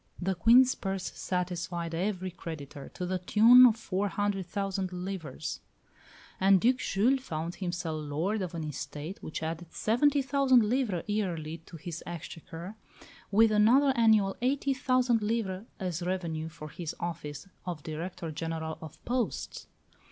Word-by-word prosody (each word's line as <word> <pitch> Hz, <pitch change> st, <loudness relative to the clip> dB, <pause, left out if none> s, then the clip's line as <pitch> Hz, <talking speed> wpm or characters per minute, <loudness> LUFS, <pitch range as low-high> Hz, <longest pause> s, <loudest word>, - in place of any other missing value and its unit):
The 190 Hz, +1 st, 0 dB
Queen's 240 Hz, +8 st, +6 dB
purse 195 Hz, -1 st, -3 dB
satisfied 175 Hz, -2 st, -3 dB
every 185 Hz, +1 st, -2 dB
creditor, 155 Hz, -5 st, -8 dB
to 180 Hz, -, -3 dB
the 185 Hz, +1 st, -1 dB
tune 230 Hz, +7 st, +8 dB
of 225 Hz, -, +3 dB
four 205 Hz, -3 st, -2 dB
hundred 200 Hz, -2 st, -1 dB
thousand 195 Hz, -1 st, -2 dB
livres, 180 Hz, -6 st, -5 dB, 0.8 s
and 195 Hz, 0 st, +6 dB
Duc 250 Hz, +6 st, +3 dB
Jules 250 Hz, +4 st, +2 dB
found 165 Hz, -7 st, -4 dB
himself 170 Hz, -4 st, -3 dB
lord 165 Hz, +9 st, -1 dB
of 180 Hz, -2 st, -4 dB
an 165 Hz, -, -3 dB
estate 150 Hz, +4 st, -6 dB
which 155 Hz, -, -5 dB
added 165 Hz, +1 st, -4 dB
seventy 275 Hz, +6 st, +2 dB
thousand 265 Hz, -3 st, +4 dB
livres 215 Hz, -5 st, 0 dB
yearly 170 Hz, -7 st, -2 dB
to 165 Hz, -, -9 dB
his 170 Hz, +1 st, -6 dB
exchequer, 175 Hz, +3 st, -8 dB, 0.5 s
with 220 Hz, +2 st, +5 dB
another 245 Hz, +7 st, +5 dB
annual 220 Hz, -4 st, +4 dB
eighty 275 Hz, +2 st, +1 dB
thousand 255 Hz, -3 st, +2 dB
livres 210 Hz, -2 st, -2 dB
as 180 Hz, -3 st, -3 dB
revenue 170 Hz, -3 st, -2 dB
for 155 Hz, -2 st, -9 dB
his 160 Hz, +2 st, -6 dB
office 155 Hz, -3 st, -5 dB, 0.2 s
of 165 Hz, -5 st, -4 dB
Director 165 Hz, +1 st, -5 dB
General 160 Hz, 0 st, -4 dB
of 160 Hz, -2 st, -9 dB
Posts. 245 Hz, -1 st, -2 dB
185 Hz, 145 wpm, -30 LUFS, 165-220 Hz, 0.8 s, tune